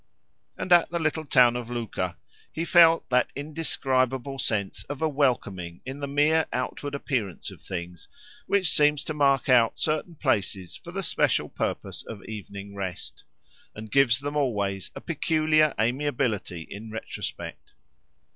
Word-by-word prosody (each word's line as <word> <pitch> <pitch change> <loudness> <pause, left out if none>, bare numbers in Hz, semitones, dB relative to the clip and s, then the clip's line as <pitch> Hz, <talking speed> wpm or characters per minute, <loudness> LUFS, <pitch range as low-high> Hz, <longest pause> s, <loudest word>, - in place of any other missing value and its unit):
And 180 - +2
at 175 -1 +6
the 170 - -1
little 155 -1 -1
town 125 -3 +5
of 120 -1 -4
Luca, 110 -7 -3 0.3
he 165 - -3
felt 165 -1 +6
that 125 0 +3
indescribable 135 -3 -1
sense 105 -5 -1
of 145 -1 -6
a 160 - +2
welcoming 100 - -1
in 135 +2 -6
the 140 - -3
mere 150 +3 +3
outward 140 +3 -3
appearance 120 - -3
of - - -14
things, 90 -1 -6 0.4
which 195 -4 +3
seems 150 -1 +3
to 155 - -3
mark 140 -2 +3
out 120 -3 +4
certain 155 +2 -1
places 100 - -1
for - - -10
the - - -3
special - - +1
purpose - - -3
of 105 -4 -9
evening 100 -2 -8
rest, 95 -3 -6 0.5
and 110 0 -9
gives 130 -3 +4
them 145 +1 -4
always 100 -9 -1
a - - -7
peculiar 155 -1 +2
amiability 120 - 0
in 110 +3 -8
retrospect. 110 0 -6
130 Hz, 145 wpm, -26 LUFS, 105-150 Hz, 0.5 s, at